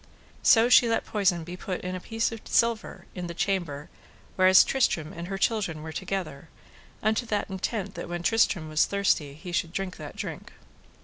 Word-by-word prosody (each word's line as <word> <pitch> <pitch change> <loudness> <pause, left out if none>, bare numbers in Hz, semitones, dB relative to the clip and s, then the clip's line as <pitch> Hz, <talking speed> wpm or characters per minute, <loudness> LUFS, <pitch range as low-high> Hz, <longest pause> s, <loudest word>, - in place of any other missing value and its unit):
So 230 0 +6
she 245 -1 +6
let 225 - 0
poison 190 -6 +1
be 175 +2 -7
put 180 0 -5
in 180 0 -4
a 185 - -4
piece 225 +5 -1
of 225 -1 -7
silver 230 -1 0
in 180 -1 -5
the 170 - -7
chamber 175 -7 -2 0.5
whereas 185 0 +7
Tristram 165 - 0
and 170 +1 -7
her 195 +1 -4
children 195 -7 -1
were 160 - -6
together, 175 -4 -5 0.5
unto 220 +3 +1
that 205 -2 -2
intent 195 +1 -3
that - - -7
when 175 0 -4
Tristram 200 -6 +2
were 155 0 -9
thirsty 155 -6 +2
he 175 +4 -9
should 170 -1 -1
drink 190 0 -4
that - - -9
drink. - - -7
185 Hz, 185 wpm, -27 LUFS, 170-210 Hz, 0.5 s, whereas